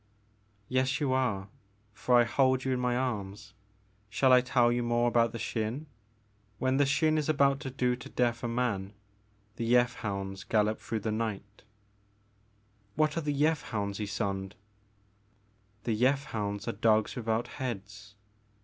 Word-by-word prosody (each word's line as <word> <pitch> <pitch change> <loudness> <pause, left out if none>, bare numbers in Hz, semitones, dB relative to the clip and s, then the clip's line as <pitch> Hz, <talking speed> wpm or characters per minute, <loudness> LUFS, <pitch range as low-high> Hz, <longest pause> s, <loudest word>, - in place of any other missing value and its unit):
"Yes 130 +2 +1
you 140 -4 +1
are, 115 -7 0 0.5
for 120 +3 +3
I - - +6
hold 130 +2 +2
you 130 - +1
in 125 - -1
my 125 -1 0
arms. 105 -5 -4 0.6
Shall 130 +5 +3
I 125 - +7
tell 125 -1 +3
you 120 0 0
more 120 0 +1
about 115 -1 +3
the 115 - -5
Xin? 115 +6 -3 0.7
When 130 +3 +1
the 145 - +4
Xin 155 +2 +2
is 150 - -2
about 140 -2 +3
to 140 -2 -5
do 125 -1 0
to 125 - -11
death 120 -1 0
a - - 0
man, 115 -5 -1 0.6
the - - -3
Yeth 125 +1 +3
hounds 95 -2 -4
gallop 110 +1 +1
through 110 -1 -4
the 110 - -2
night 105 -2 -4 0.4
" 105 +1 -38
" 105 0 -38
What 155 0 +2
are 165 - -1
the 150 -1 -1
Yeth 150 +2 +2
hounds, 100 -2 -3
Ysonde? 100 -2 -3 0.7
" 105 0 -38
"The 115 - 0
Yeth 135 +5 +2
hounds 100 -2 -3
are - - +1
dogs 110 +1 +2
without 115 0 -1
heads. 105 -4 -7
115 Hz, 165 wpm, -30 LUFS, 105-130 Hz, 0.7 s, I